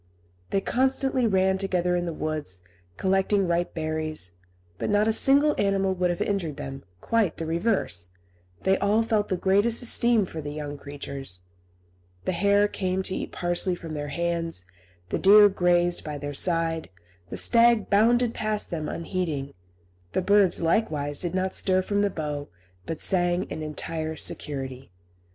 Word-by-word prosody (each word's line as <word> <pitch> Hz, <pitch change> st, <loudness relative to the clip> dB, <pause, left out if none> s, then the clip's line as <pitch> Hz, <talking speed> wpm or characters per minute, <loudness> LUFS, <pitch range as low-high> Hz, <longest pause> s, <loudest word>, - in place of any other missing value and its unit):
They 195 Hz, -, +1 dB
constantly 260 Hz, +1 st, +1 dB
ran 190 Hz, -1 st, +2 dB
together 180 Hz, -2 st, 0 dB
in 175 Hz, 0 st, -1 dB
the -, -, -2 dB
woods, 150 Hz, -, -3 dB, 0.3 s
collecting 195 Hz, +1 st, +1 dB
ripe 175 Hz, +1 st, -1 dB
berries; 155 Hz, -, -2 dB, 0.5 s
but -, -, -2 dB
not 205 Hz, +1 st, +3 dB
a 225 Hz, -, +2 dB
single 285 Hz, +5 st, +5 dB
animal 195 Hz, -1 st, +1 dB
would 180 Hz, -1 st, 0 dB
have 175 Hz, -, -1 dB
injured 175 Hz, -8 st, -2 dB
them; 135 Hz, 0 st, -7 dB, 0.2 s
quite 225 Hz, -7 st, +1 dB
the 165 Hz, -, -4 dB
reverse, 165 Hz, -, 0 dB, 0.6 s
they 190 Hz, 0 st, +2 dB
all 210 Hz, +3 st, +2 dB
felt 220 Hz, -2 st, 0 dB
the 185 Hz, -, 0 dB
greatest 205 Hz, +6 st, +2 dB
esteem 235 Hz, -3 st, +3 dB
for 160 Hz, -3 st, -7 dB
the 145 Hz, 0 st, -6 dB
young 145 Hz, -1 st, -5 dB
creatures. 140 Hz, -8 st, -6 dB, 0.8 s
The -, -, +1 dB
hare 200 Hz, +3 st, +3 dB
came 190 Hz, -2 st, -2 dB
to 190 Hz, -, -3 dB
eat -, -, -4 dB
parsley 175 Hz, +1 st, 0 dB
from 165 Hz, -2 st, -8 dB
their 145 Hz, -1 st, -4 dB
hands, 165 Hz, -, -2 dB, 0.4 s
the -, -, -1 dB
deer 205 Hz, +2 st, +8 dB
grazed 175 Hz, -2 st, +1 dB
by 150 Hz, -1 st, -5 dB
their 145 Hz, 0 st, -5 dB
side, 165 Hz, 0 st, 0 dB, 0.4 s
the -, -, -5 dB
stag 235 Hz, -2 st, +4 dB
bounded 235 Hz, +3 st, +3 dB
past 215 Hz, -1 st, -2 dB
them 155 Hz, -3 st, -3 dB
unheeding; 165 Hz, -6 st, -3 dB, 0.6 s
the 185 Hz, -, 0 dB
birds, 200 Hz, -2 st, +4 dB
likewise, 155 Hz, -6 st, 0 dB
did 175 Hz, 0 st, -2 dB
not 190 Hz, 0 st, -1 dB
stir 185 Hz, -1 st, +1 dB
from 205 Hz, +1 st, 0 dB
the 205 Hz, -, +2 dB
bough, 150 Hz, -4 st, -4 dB, 0.4 s
but 160 Hz, -, -4 dB
sang 175 Hz, -1 st, +2 dB
in -, -, -4 dB
entire 155 Hz, +1 st, -4 dB
security. 135 Hz, -4 st, -4 dB
180 Hz, 160 wpm, -26 LUFS, 155-205 Hz, 0.8 s, deer